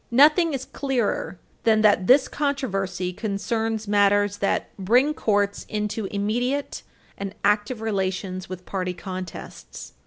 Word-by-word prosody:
Nothing 300 +5 +5
is 265 0 -5
clearer 250 -8 -2 0.3
than 220 -1 +4
that 205 -4 +4
this 265 +1 +6
controversy 195 - -2
concerns 220 +2 -2
matters 205 0 +3
that 200 - -1
bring 245 +10 +3
courts 205 -6 0
into 210 0 -2
immediate 240 +8 -2 0.4
and 200 0 -5
active 210 +3 +1
relations 190 -3 -2
with 185 -1 -7
party 185 -2 -3
contests. 185 0 -8
205 Hz, 120 wpm, -24 LUFS, 195-240 Hz, 0.4 s, this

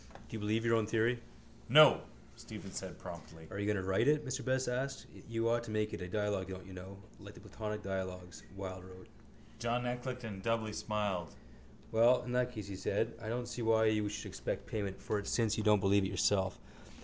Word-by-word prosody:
Do - - -14
you 110 - -3
believe 110 +2 0
your 115 - +4
own 110 -2 +1
theory? 115 +2 +2 0.5
—No, - - +9 0.3
Stephen - - -9
said - - -6
promptly. 80 -1 -9
—Are 100 - -4
you 100 - -1
going 105 -1 +2
to 95 - -2
write 95 +6 +3
it? 150 0 +4
Mr 130 -1 -3
Best 130 0 +1
asked. 130 +2 -2 0.2
You 115 0 0
ought 120 0 +2
to - - -8
make 110 0 0
it - - -4
a 90 - -4
dialogue, 105 -1 -1
don't 95 0 -7
you 95 - -10
know, 95 +2 -8 0.2
like 100 0 -11
the - - -11
Platonic 105 +2 -5
dialogues 95 -2 -4
Wilde 95 -1 -6
wrote. 95 0 -13 0.5
John 120 +1 0
Eclecticon 125 -4 -4
doubly 110 0 0
smiled. 105 -6 -2 0.6
—Well, 120 +3 +5
in 120 - -5
that 125 0 +1
case, 105 -4 -6
he 100 - -5
said, 115 +4 0
I 110 - -4
don't 120 +1 -2
see 120 0 -4
why 110 -1 +4
you 105 -1 +2
should 105 - -5
expect - - -4
payment 100 -3 -3
for 105 - -1
it 100 - -6
since 115 -2 +2
you 110 - -1
don't 105 -1 +5
believe 100 +1 +4
it 95 - 0
yourself. 95 -2 +2
105 Hz, 215 wpm, -34 LUFS, 95-115 Hz, 0.6 s, No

